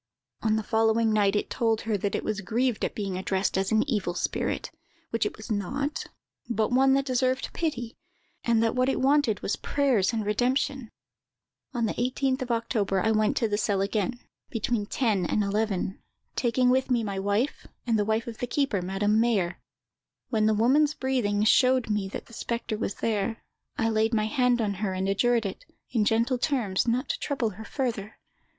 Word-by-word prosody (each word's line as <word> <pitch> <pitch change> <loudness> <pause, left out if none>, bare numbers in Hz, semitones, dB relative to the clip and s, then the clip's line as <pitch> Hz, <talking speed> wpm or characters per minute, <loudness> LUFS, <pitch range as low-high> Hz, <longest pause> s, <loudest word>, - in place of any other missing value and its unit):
"On 215 -1 +2
the 220 - -1
following 225 +1 +2
night 205 -1 +3
it 210 - -1
told 225 -3 +1
her 225 -1 -1
that 200 0 -1
it - - -2
was 215 -2 -2
grieved 235 +4 0
at - - -1
being 195 -3 -3
addressed 190 +1 0
as 190 0 0
an 220 +4 +3
evil 200 -9 -1
spirit, - - -2 0.4
which 230 -2 +1
it - - -8
was 220 +2 -8
not, 275 +9 -2 0.4
but 220 0 0
one 265 +2 +4
that 275 0 +2
deserved 255 0 0
pity; 245 -8 -3 0.4
and 230 -1 +3
that 225 - +1
what 255 +1 +2
it - - 0
wanted 270 -5 +2
was - - 0
prayers 255 -9 +1
and 220 -3 -2
redemption. 250 +3 0 0.9
"On 235 -1 +1
the 215 - -1
18th 260 +2 0
of 255 - -4
October, 225 -4 0
I 220 +4 +2
went 215 -1 +2
to 230 - +2
the 205 -1 -1
cell 205 -2 +1
again, 210 +4 -1 0.3
between 225 -2 -1
ten 215 -8 +1
and 210 +4 +1
eleven, 200 -2 -1 0.3
taking 250 0 +2
with 260 +1 +1
me 240 -3 +2
my 200 -2 -3
wife, 205 +8 -1 0.2
and 230 -3 +2
the - - +3
wife 220 +2 0
of 230 -2 -8
the 245 - -2
keeper, 245 -6 0
Madame 200 +4 +1
Mayer. 210 -7 +1 0.7
When 215 -2 +2
the 220 - +3
woman's 285 +7 +3
breathing 230 -6 0
showed 255 +1 +4
me 210 -2 0
the 190 - -6
spectre 235 -1 -3
was 210 -2 -3
there, 220 0 -1 0.3
I 225 - +1
laid 220 +1 +2
my 215 -1 +2
hand 245 +1 +2
on 205 -2 0
her, 195 -3 0
and 190 +1 -1
adjured 230 +3 +2
it, 195 - -5 0.3
in 220 -4 +2
gentle 230 +4 +2
terms, 235 -8 0
not 245 +4 +1
to - - -1
trouble 260 -6 -1
her 210 +3 -9
further. 220 -4 -3
225 Hz, 190 wpm, -27 LUFS, 205-250 Hz, 0.9 s, one